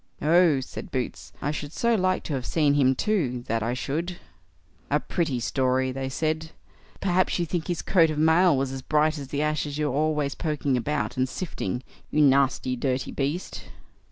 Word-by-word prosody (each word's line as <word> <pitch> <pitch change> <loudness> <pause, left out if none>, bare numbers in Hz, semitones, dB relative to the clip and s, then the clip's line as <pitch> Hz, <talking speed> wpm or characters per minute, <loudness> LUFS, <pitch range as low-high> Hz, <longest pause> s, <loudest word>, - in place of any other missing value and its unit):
"Oh!" 160 -3 +4
said 130 - -8
Boots, 130 -2 -4
"I 145 - 0
should 150 -1 -5
so 235 +7 +1
like 185 -3 +1
to 155 - -4
have 130 -2 -2
seen 150 -3 +2
him 135 -2 +3
too, 130 - 0
that 115 0 -1
I 115 +3 -1
should." 160 +8 -3 0.7
"A 150 - +3
pretty 150 -6 -1
story", 130 +1 +1
they 135 0 -3
said. 160 +3 -2 0.5
"Perhaps 185 -1 +2
you 175 - 0
think 165 0 -3
his 175 -2 -2
coat 165 -4 +4
of 155 - -3
mail 160 +1 +4
was 135 0 -1
as 135 0 -5
bright 155 +2 +1
as 140 - -7
the 145 +2 -1
ashes 150 -1 -1
you 150 -1 0
are - - -3
always 150 -1 +1
poking 150 -4 -1
about, 140 +3 -2
and 130 0 +1
sifting, 125 - -4 0.3
you 150 - 0
nasty 135 -2 +3
dirty 130 +1 -1
beast." 145 +6 -3
145 Hz, 185 wpm, -26 LUFS, 130-160 Hz, 0.7 s, Oh